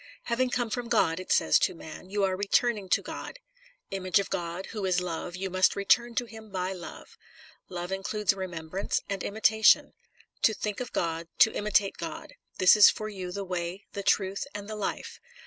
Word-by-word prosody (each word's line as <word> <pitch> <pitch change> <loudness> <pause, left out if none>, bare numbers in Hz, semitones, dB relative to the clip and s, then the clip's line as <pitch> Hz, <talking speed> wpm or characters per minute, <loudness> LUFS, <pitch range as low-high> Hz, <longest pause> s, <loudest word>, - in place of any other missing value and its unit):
" - - -30
Having 255 +2 +2
come 240 -2 -1
from 245 +1 -3
God," 185 -8 +2
it 185 - -6
says - - +4
to 185 - +1
man, 165 +3 -10
"you 205 0 0
are 190 -1 +2
returning 205 0 +1
to - - +2
God. - - -7 0.5
Image 185 -3 +1
of 200 - -1
God, 175 +2 -3
who 210 -2 -4
is 185 -1 +2
love, 175 0 -4
you 190 +2 -3
must 185 0 +3
return 235 +4 +2
to 250 - 0
him 220 -1 -12
by 185 -1 -2
love. 175 -2 -11 0.5
Love 180 0 -5
includes 195 +1 0
remembrance 185 -1 -3
and 195 -1 -3
imitation. 220 +1 +4 0.5
To 220 - +4
think 210 -1 -3
of 250 - -5
God, 165 0 -2
to 220 - +6
imitate 205 -1 +1
God; 315 -2 -7 0.2
this 185 - +7
is 210 -2 +9
for 215 0 -3
you 185 -3 -6
the 200 +2 -4
way, 180 +1 -4
the 200 - -4
truth, 195 +2 +1
and 205 -1 -6
the 215 - -5
life. 210 - -4
195 Hz, 195 wpm, -28 LUFS, 180-215 Hz, 0.5 s, is